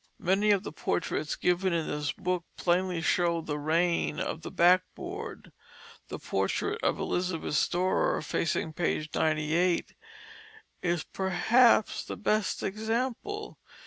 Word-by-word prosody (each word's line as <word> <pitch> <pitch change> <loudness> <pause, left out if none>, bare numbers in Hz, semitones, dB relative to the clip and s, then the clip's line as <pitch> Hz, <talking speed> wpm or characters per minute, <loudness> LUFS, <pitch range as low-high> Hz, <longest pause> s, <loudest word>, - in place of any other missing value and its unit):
Many 195 +4 +2
of 200 -2 +3
the - - -6
portraits 155 -1 -2
given 180 +1 +1
in 165 -2 0
this 150 -1 -2
book 180 +2 -2
plainly 180 -1 +1
show 170 0 +2
the 150 -2 -4
reign 165 +1 +1
of 160 - -3
the - - -6
backboard. 185 - 0 0.6
The - - -6
portrait 435 +2 -1
of - - +2
Elizabeth 180 -4 -2
Storer, 180 +5 +1
facing 160 -1 -1
page 155 -2 -1
98, 160 +3 +1 0.9
is 175 -2 0
perhaps 215 +5 +3
the - - -6
best 215 -1 0
example. 245 - -3
180 Hz, 120 wpm, -29 LUFS, 165-205 Hz, 0.9 s, of